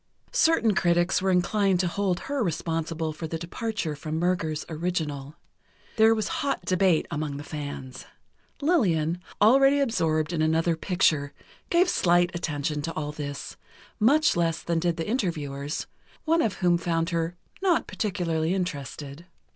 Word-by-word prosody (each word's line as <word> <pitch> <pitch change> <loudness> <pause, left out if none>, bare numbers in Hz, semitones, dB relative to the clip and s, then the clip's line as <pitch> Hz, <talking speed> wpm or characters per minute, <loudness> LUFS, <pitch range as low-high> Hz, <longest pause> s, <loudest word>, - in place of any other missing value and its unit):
Certain 235 -10 +3
critics 175 0 +2
were 190 - +1
inclined 190 +1 +2
to 180 - +1
hold 185 0 -1
her 280 -3 -2
responsible 165 -2 -2
for 160 +1 -6
the 165 - -3
departure 175 -1 -3
from 155 +2 -4
Murger's 165 -3 -1
original. 155 -4 -3 0.6
There 220 0 +6
was 215 -2 -1
hot 275 -10 -1
debate 185 -2 +3
among 150 -1 -3
the 145 - -7
fans. 145 -4 -7 0.6
Lillian, 175 - +2 0.2
already 270 +6 +5
absorbed 165 - +1
in 160 - 0
another 165 +2 +2
picture, 160 -5 +1 0.4
gave 350 +2 +4
slight 175 - +3
attention 150 -3 -2
to 165 +2 -4
all 150 -1 -3
this; 145 -1 -6 0.4
much 290 +8 +4
less 165 -2 0
than 170 -1 0
did 170 0 0
the 165 - -3
interviewers, 150 - -2 0.4
one 330 +1 +3
of 215 - 0
whom 175 -2 +2
found 165 0 -1
her 165 +1 -1 0.3
"not 365 -4 +2
particularly 180 -4 -1
interested." 150 -2 -5
170 Hz, 145 wpm, -26 LUFS, 155-195 Hz, 0.6 s, There